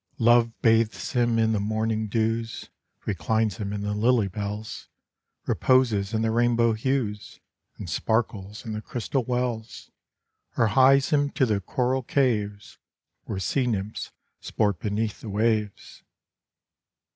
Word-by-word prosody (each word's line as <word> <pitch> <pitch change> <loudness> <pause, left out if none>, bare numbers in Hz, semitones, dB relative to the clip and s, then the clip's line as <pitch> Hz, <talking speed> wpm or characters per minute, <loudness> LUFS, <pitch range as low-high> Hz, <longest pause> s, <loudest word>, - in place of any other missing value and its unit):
Love 120 0 +3
bathes 115 +4 +2
him 120 -3 +2
in 110 0 +2
the 110 - +1
morning 110 +1 -1
dews, 115 +1 -2 0.3
Reclines 110 +2 0
him 100 -1 -4
in 105 0 -4
the 105 0 -2
lily 115 0 +2
bells, 105 +2 -6 0.6
Reposes 115 -6 +2
in 110 -1 0
the 110 - +1
rainbow 115 0 +3
hues, 110 -3 -2 0.4
And - - -7
sparkles 105 -2 -2
in 110 - -4
the 105 - -4
crystal 125 +4 -2
wells, 120 -2 -3 0.7
Or 115 - +3
hies 135 +3 +5
him 145 -1 +2
to 135 - +2
the 105 -4 0
coral 125 +6 0
caves, 105 -7 -1 0.5
Where - - -4
sea 125 +7 0
nymphs 105 -2 -3 0.3
sport 100 -5 -1
beneath 105 +1 -2
the 110 - -7
waves. 105 0 -1
110 Hz, 135 wpm, -25 LUFS, 105-120 Hz, 0.7 s, hies